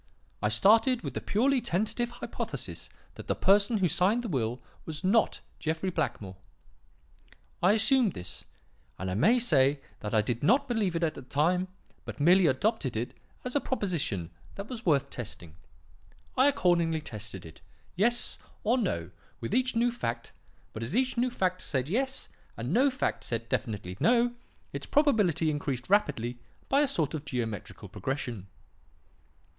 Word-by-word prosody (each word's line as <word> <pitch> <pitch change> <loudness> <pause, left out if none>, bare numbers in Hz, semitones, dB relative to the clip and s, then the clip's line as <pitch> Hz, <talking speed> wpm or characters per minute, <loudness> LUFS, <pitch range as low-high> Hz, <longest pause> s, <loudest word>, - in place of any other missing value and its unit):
I 105 - +2
started 225 - +4
with - - -4
the - - -3
purely 255 +5 +2
tentative 220 +6 -1
hypothesis 240 0 -6 0.2
that - - -10
the - - +1
person 205 +3 +4
who 190 -3 +2
signed 195 +9 +2
the - - -3
will 125 - -1 0.2
was 155 +2 -6
not 210 +4 +2 0.2
Jeffrey 160 +4 -1
Blackmore. 105 - -3 1.2
I 185 +4 +5
assumed 220 0 +3
this; 90 - -7 0.5
and 95 0 -3
I - - -1
may 195 - +4
say 145 - +3 0.2
that 105 +1 -3
I 105 - +4
did 120 +1 -2
not 255 - +3
believe 215 -8 0
it 165 - 0
at 160 -2 +1
the - - -9
time, 165 +8 +1 0.4
but - - -8
merely 175 +4 +5
adopted 135 - 0
it 120 +2 -3 0.3
as 250 - -3
a 285 - +3
proposition 160 - -2 0.2
that 200 +1 -6
was 235 -5 -6
worth 140 -3 +2
testing. 90 -9 -7 0.8
I 260 +2 +5
accordingly 170 - +2
tested 105 - -8
it, 80 -1 -13 0.3
'Yes?' 235 +6 +3 0.2
or 240 +4 +2
'No?' 85 - -2 0.3
with 120 - -4
each 255 0 +2
new 240 +1 +3
fact; 115 - -4 0.4
but 110 - -6
as 120 - -3
each 255 +1 +2
new 250 +1 +1
fact 185 -6 -1
said 130 -2 -2
'Yes,' 265 - -1 0.3
and 120 +7 -3
no 265 +6 +5
fact 260 0 -2
said 115 -1 -4
definitely 100 -8 -3
'No,' 240 0 +3 0.4
its - - -5
probability 205 - +3
increased 140 -4 -3
rapidly 120 - +1 0.3
by 275 +2 +4
a 295 - +3
sort 165 - -1
of 155 -2 -4
geometrical 115 -8 -5
progression. 120 -8 -4
170 Hz, 160 wpm, -29 LUFS, -, 1.2 s, I